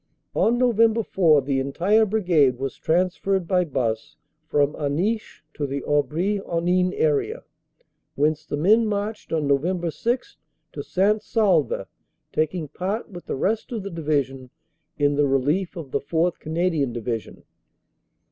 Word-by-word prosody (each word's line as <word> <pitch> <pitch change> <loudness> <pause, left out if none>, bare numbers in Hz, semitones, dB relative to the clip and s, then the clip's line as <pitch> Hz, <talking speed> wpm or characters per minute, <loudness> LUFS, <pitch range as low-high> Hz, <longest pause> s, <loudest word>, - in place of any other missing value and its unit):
On 235 +2 +2
Nov. 240 -3 +2 0.2
4 155 -7 +4
the 135 0 0
entire 185 +11 +2
Brigade 175 - +3
was 135 +1 -4
trans 180 +3 +1
ferred 195 -2 0
by 180 +1 +2
bus 120 -8 -2 0.3
from 145 0 +2
Aniche 175 +10 -2
to 145 - -3
the 140 0 -4
Aubry 160 +8 0
Henin 180 +2 +1
area, 155 - 0 0.7
whence 155 +2 +1
the 145 - -4
men 215 +9 +4
marched 210 +1 -3
on 155 -2 0
Nov. 165 +4 0
6 245 - -2 0.3
to - - -6
St. 205 +3 +1
Saulve, 185 - +1 0.5
taking 155 +1 -1
part 190 +10 -4
with 175 -2 -10
the - - -2
rest 215 - -1
of 225 -5 -3
the 200 - -6
Division 140 -5 -2 0.5
in 145 0 +2
the 145 -1 +3
relief 145 +8 0
of 155 -6 -8
the - - 0
4th. 165 +4 0
Canadian 160 -5 0
Divi 115 0 -2
sion. - - -16
165 Hz, 145 wpm, -24 LUFS, 145-195 Hz, 0.7 s, 4